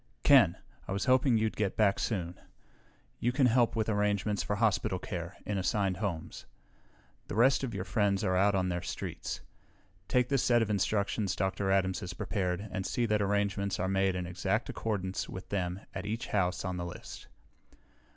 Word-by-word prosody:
"Ken! - - +6 0.3
I - - -2
was 100 - -1
hoping 130 -2 +4
you'd 110 0 0
get 105 -2 -1
back 100 -2 +3
soon. 90 -6 -2 0.8
You 120 - +1
can 130 +1 +3
help 120 -1 +3
with 110 -2 0
arrangements 105 -1 +1
for 105 - -1
hospital 105 -3 +1
care, 90 0 -6
in 105 -2 -1
assigned 95 -1 0
homes. 95 -6 -4 0.8
The - - -5
rest 130 +5 +4
of 120 -5 -3
your 95 - -2
friends 100 -1 +1
are 95 - +1
out 100 +2 +3
on 90 -1 +1
their 90 0 -2
streets. - - -5 0.7
Take 125 -1 +2
this 135 -3 +2
set 120 -2 +4
of 110 - -2
instructions 100 -1 0
Dr. 95 +1 -1
Adams 95 -1 +2
has 90 -1 -6
prepared 90 +1 -2
and 95 - -2
see 120 +5 0
that 105 -2 +1
arrangements 100 -1 0
are 95 - 0
made 95 0 +1
in 90 -1 -2
exact 95 +6 -1
accordance 95 -4 -3
with 95 - -8
them 90 -1 -2
at 95 +1 -5
each 110 +2 -3
house 90 -2 0
on 90 -1 -2
the 85 - -3
list." 85 - -9
100 Hz, 180 wpm, -31 LUFS, 95-110 Hz, 0.8 s, Ken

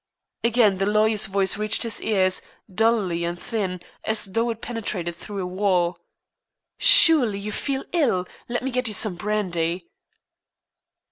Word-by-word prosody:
Again 225 -5 +2
the 195 - 0
lawyer's 215 0 +2
voice 195 0 +1
reached 215 +2 0
his 230 -2 0
ears, 190 -3 +1 0.3
dully 205 -5 +1
and 170 +1 -4
thin, 190 -6 -4 0.2
as 220 0 +1
though 230 +5 -1
it 225 -1 -4
penetrated 200 -8 -4
through 195 +2 -7
a - - -4
wall. 180 -2 0 0.8
"Surely, 305 - +7
you 205 +1 -6
feel 270 +5 -3
ill? 255 - +1 0.2
Let 240 +1 -2
me 265 - -3
get 250 0 -1
you 215 - -4
some 215 -4 0
brandy." 175 -3 -3
210 Hz, 145 wpm, -23 LUFS, 185-230 Hz, 0.8 s, Surely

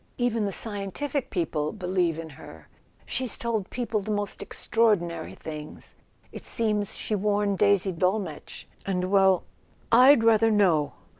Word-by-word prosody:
Even 235 -3 0
the 200 - -2
scientific 225 +8 -2
people 155 -5 -2
believe 180 -5 -1
in 165 -1 -7
her. 80 - -13 0.4
She's 255 -3 -1
told 225 -5 -2
people 235 -3 -2
the 200 - -8
most 205 -1 -3
extraordinary 175 -8 0
things—it 150 -1 -11
seems 210 -3 -1
she - - -4
warned 205 -1 0
Daisy 200 -2 +3
de 165 - -10
Dolmetsch... 185 -4 -2 0.2
Well, 190 0 +2 0.5
I'd 250 +1 +7
rather 225 0 +4
know!" 180 -9 +2
200 Hz, 130 wpm, -26 LUFS, 180-225 Hz, 0.5 s, I'd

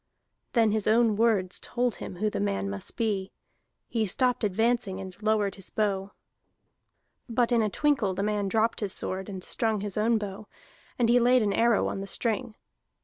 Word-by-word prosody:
Then 225 -3 +4
his 215 -1 0
own 225 -1 +4
words 205 -5 +2
told 245 -2 -1
him - - -7
who 210 +4 -1
the - - -3
man 100 -1 -1
must 100 -1 -4
be; 200 -4 -1 0.6
he 225 -3 -1
stopped 250 +5 +1
advancing, 215 -1 +1
and 190 -1 -8
lowered 210 -2 +1
his 195 -2 -9
bow. 200 -2 -1 1.2
But 235 +1 +1
in 235 -1 +4
a 215 - +1
twinkle 260 -7 +1
the 195 - -1
man 205 -1 0
dropped 225 +3 +1
his 205 -3 -1
sword 190 +1 -3
and 190 -2 -6
strung 220 -1 -1
his 205 -1 -5
own 225 +2 +3
bow, 205 0 -6 0.5
and 240 - +2
he 240 +1 +5
laid 245 0 +4
an 205 -1 +1
arrow 230 -2 +3
on 195 - -3
the 195 - -6
string. 230 +1 -2
215 Hz, 185 wpm, -27 LUFS, 195-230 Hz, 1.2 s, he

